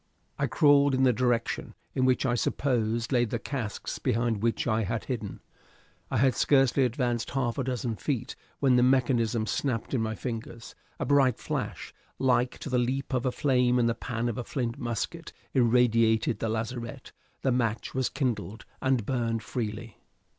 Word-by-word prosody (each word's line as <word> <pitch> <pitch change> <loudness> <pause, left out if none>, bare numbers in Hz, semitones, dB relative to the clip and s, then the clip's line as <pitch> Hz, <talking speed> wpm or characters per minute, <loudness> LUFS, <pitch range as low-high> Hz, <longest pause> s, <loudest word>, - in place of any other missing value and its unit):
I - - +1
crawled 145 -2 +4
in 130 - +2
the 125 -2 +5
direction 120 -1 -1 0.2
in 130 - +1
which 130 +1 +2
I 120 - +2
supposed 115 -2 0
lay 125 -2 +3
the 115 - -1
casks 120 -7 -4
behind 115 -2 0
which 115 0 0
I 115 -2 +1
had 110 +2 -2
hidden. 110 -6 -5 0.7
I - - 0
had 130 +2 +4
scarcely 135 -1 +3
advanced 120 -1 -1
half 130 -1 -1
a - - +1
dozen 120 -3 -2
feet 135 -7 -3 0.2
when 130 -3 +4
the - - +5
mechanism 120 -3 +2
snapped 115 +3 -2
in 125 - +1
my 110 0 -2
fingers; 115 0 -6 0.3
a - - -1
bright 135 -4 +3
flash, - - -4 0.2
like 125 -1 +1
to - - -5
the 125 - +3
leap 130 +3 -1
of 130 0 +1
a - - +1
flame 125 -2 +2
in 120 - +3
the 115 - +2
pan 120 0 -3
of 120 0 -2
a - - -2
flint 120 -2 -3
musket, 120 -2 -4 0.2
irradiated 115 -2 +3
the 115 - -1
lazarette; 115 +1 -4 0.3
the 130 - +2
match 115 -3 -1
was 130 -1 0
kindled, 120 -5 -3 0.2
and 130 -5 +1
burnt 115 -3 -1
freely. 110 -2 -5
120 Hz, 175 wpm, -28 LUFS, 115-130 Hz, 0.7 s, the